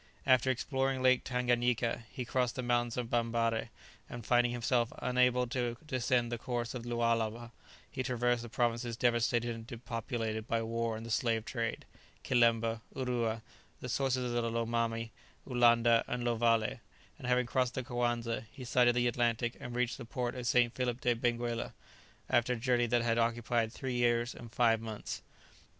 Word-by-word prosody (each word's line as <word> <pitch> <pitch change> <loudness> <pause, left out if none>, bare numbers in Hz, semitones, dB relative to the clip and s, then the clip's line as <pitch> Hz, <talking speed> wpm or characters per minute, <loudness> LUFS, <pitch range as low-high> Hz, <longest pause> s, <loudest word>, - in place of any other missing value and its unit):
After 130 -1 +4
exploring 130 +1 0
Lake 130 -1 +4
Tanganyika 120 -2 0
he 125 -3 -5
crossed 125 0 0
the 130 - -3
mountains 120 -1 0
of 120 -1 -3
Bambarre, 115 -1 0 0.4
and 120 -2 -7
finding 120 0 +3
himself 120 0 +1
unable 125 0 +2
to 120 -2 -2
descend 125 -4 0
the 120 - -3
course 120 -1 -3
of 125 - -5
the 120 - -7
Lualaba, 115 0 0 0.4
he 130 - -3
traversed 120 -2 +1
the 120 - -8
provinces 120 0 -1
devastated 120 0 +1
and 115 0 -9
depopulated 115 -2 -4
by 115 0 0
war 115 0 -2
and 110 - -8
the 115 - -6
slave 115 -2 +1
trade, 115 -2 -3 0.4
Kilemba, 115 -2 +2
Urua, 120 -4 -1 0.4
the 125 - -6
sources 125 -1 0
of 120 - +1
the 115 - 0
Lomami, 115 0 -1 0.4
Ulanda, 120 -2 +4
and 125 0 -3
Lovalé, 115 -2 +2 0.4
and - - -6
having 125 0 +3
crossed 125 0 0
the 130 - -2
Coanza, 120 -2 -1
he 130 -3 -9
sighted 120 0 +4
the 120 0 +2
Atlantic 120 0 0
and 120 0 -7
reached 125 +2 0
the 120 - -7
port 120 +1 -3
of 125 -2 -4
St. 125 -3 +3
Philip 125 -1 -2
de 120 - +3
Benguela, 120 0 -1 0.5
after 120 +1 +2
a - - -1
journey 120 0 +1
that 120 0 +2
had 115 0 +1
occupied 115 -1 +1
three 130 +2 -4
years 120 0 +1
and 120 -2 -11
five 115 -2 +3
months. 110 -2 -6
120 Hz, 170 wpm, -32 LUFS, 115-125 Hz, 0.5 s, After